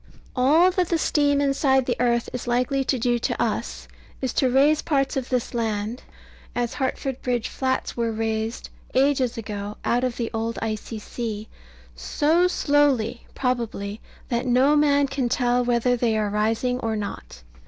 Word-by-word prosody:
All 305 +8 +5
that 360 -2 0
the 335 - +2
steam 290 -2 +2
inside 275 -2 +2
the 245 - 0
earth 235 -1 +2
is 250 -1 -5
likely 250 +3 +1
to 260 - +1
do 240 0 +1
to - - -2
us, - - -2 0.3
is 260 -3 -2
to 260 - +2
raise 285 +4 +4
parts 275 -3 0
of 265 -2 -3
this 250 -2 -1
island 220 0 -2 0.5
(as 240 -1 -1
Hartford 265 -1 -3
Bridge 245 -3 -1
Flats 260 -1 -2
were 235 -1 0
raised, 220 +1 -3 0.2
ages 265 -3 +2
ago, 210 -2 -5
out 245 +1 +1
of 250 -2 -1
the 230 -2 -2
old 225 +1 -2
icy 220 0 -4
sea) 215 -1 -5 0.5
so 310 - +2
slowly, 280 -8 +1
probably, 230 -5 -2 0.3
that 240 0 -1
no 260 +4 +4
man 285 -1 +4
can 270 -2 -2
tell 245 0 +2
whether 245 0 +2
they 230 -2 +1
are 210 -1 0
rising 225 +4 0
or 225 -2 -2
not. 60 - -6
245 Hz, 165 wpm, -24 LUFS, 225-270 Hz, 0.5 s, All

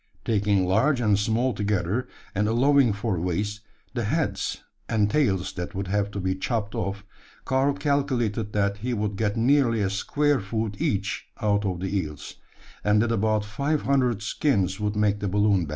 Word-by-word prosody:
Taking 100 -3 +2
large 115 +9 +2
and 105 -4 +3
small 115 +4 +1
together 105 +2 -1 0.3
and 105 +2 +1
allowing 130 +2 +4
for 100 -2 -2
waste, 100 +4 -2 0.3
the 120 -3 -2
heads 155 +7 -1 0.3
and 105 -2 +2
tails 100 -12 +1
that 90 0 -5
would 95 -1 -3
have 100 0 +1
to 100 - -5
be 95 0 0
chopped 100 +2 -2
off 100 +2 -3 0.4
Karl 135 +2 +2
calculated 130 -7 0
that 100 -1 +1
he 120 +4 -2
would 105 -1 -2
get 105 +1 -1
nearly 120 -1 +3
a 100 -2 0
square 145 +8 +1
foot 105 0 -3
each 100 -1 -1
out 105 -1 +1
of 90 -2 -2
the 95 +1 -2
eels; 75 -6 -4 0.5
and 105 0 +3
that 120 - 0
about 110 -1 +1
five 140 +8 -1
hundred 125 -6 +1
skins 100 - 0
would 105 0 -1
make 105 -1 +2
the 100 - -2
balloon 100 -2 +2
bag. - - -9
105 Hz, 175 wpm, -25 LUFS, 100-120 Hz, 0.5 s, allowing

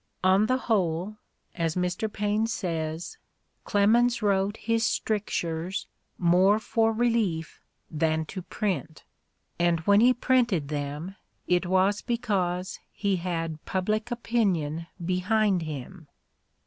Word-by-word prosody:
"On 190 +3 +4
the 255 - +2
whole," 195 -4 -1 0.4
as 165 -2 -1
Mr. 180 +4 -1
Paine 210 +1 0
says, 165 - -3 0.5
"Clemens 235 +3 +3
wrote 200 0 +1
his 230 0 0
stric 215 -3 0
tures 170 +3 -2 0.3
more 185 +4 +4
for 225 +1 +1
relief 220 -8 0 0.3
than 160 0 0
to 185 +4 -6
print," 170 -5 -3 0.6
and 170 -1 +2
when 200 +5 +4
he 245 +2 +6
printed 240 - +1
them 150 +5 -4 0.3
it 180 0 +1
was 190 +2 +2
because 190 -7 -1
he 200 -2 0
had 165 -3 -3
public 215 +4 -1
opinion 190 -10 -1 0.2
behind 185 +1 +1
him. 155 +2 -7
190 Hz, 115 wpm, -27 LUFS, 165-215 Hz, 0.6 s, he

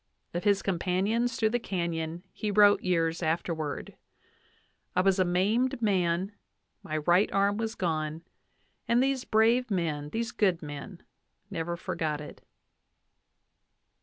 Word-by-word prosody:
Of 175 +4 -3
his 200 -1 +3
companions 195 +6 0
through 220 -3 +1
the 245 - +1
canyon 170 -4 -3
he 215 - -3
wrote 205 0 +5
years 165 -2 0
afterward: 160 -2 -2 1.0
"I 180 - +4
was 195 0 +3
a - - +5
maimed 205 +9 +1
man; 190 -3 +1 0.5
my 155 - -3
right 175 +6 +3
arm 200 +1 +2
was 225 0 -3
gone, 160 -2 -2 0.6
and 235 +2 +4
these 270 -1 0
brave 230 +3 +3
men, 160 -6 -1
these 225 +5 -2
good 185 -5 +1
men, 150 +5 -8 0.5
never 170 -1 -3
for - - -4
got 155 -2 -1
it." 150 - -10
185 Hz, 135 wpm, -29 LUFS, 165-215 Hz, 1.0 s, wrote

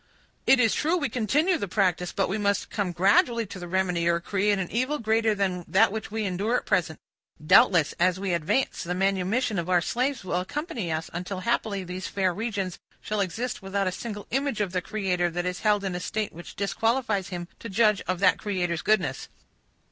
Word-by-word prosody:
It 265 - +6
is 230 -3 +4
true, 325 +4 +1
we 285 -5 -1
continue 300 - +1
the 200 - -3
practice; 180 -2 +1
but 195 - 0
we 205 +3 -2
must 200 -1 0
come 200 -4 -1
gradually 205 +6 +3
to 195 -1 -9
the 175 - -7
remedy, 180 -2 0
or 170 0 +2
create 200 +3 +1
an 185 -2 -3
evil 255 +6 0
greater 220 -1 +1
than 185 -3 -1
that 205 +2 +4
which 220 0 -5
we 220 +1 -2
endure 200 +5 0
at - - -1
present. 175 -6 0 0.5
Doubtless, 160 -1 +5
as 180 +1 +2
we 195 -2 -1
advance, 170 +11 0
the 180 0 -3
manumission 195 +3 0
of 170 +1 -4
our 180 -1 +4
slaves 255 +9 -1
will 180 -1 -1
accompany 235 - -4
us, 160 +1 -3
until 180 +2 -4
happily 215 -3 -1
these 180 +1 -5
fair 190 -2 0
regions 200 -4 -3 0.2
shall 210 -1 -2
exist, 225 +7 -3
without 195 +1 -1
a 185 - 0
single 205 +1 -6
image 270 -3 0
of 200 -4 -1
the 180 -1 -1
Creator 180 -3 -1
that 175 +1 -3
is 180 0 -2
held 210 -2 +2
in 190 -2 -2
a 180 - -3
state 210 +3 -3
which 170 -1 -10
disqualifies 220 0 0
him 175 -2 -6
to 230 - -7
judge 210 0 +3
of 185 - 0
that 185 -2 +4
Creator's 175 -5 -1
goodness." 175 -12 0
195 Hz, 205 wpm, -26 LUFS, 180-220 Hz, 0.5 s, It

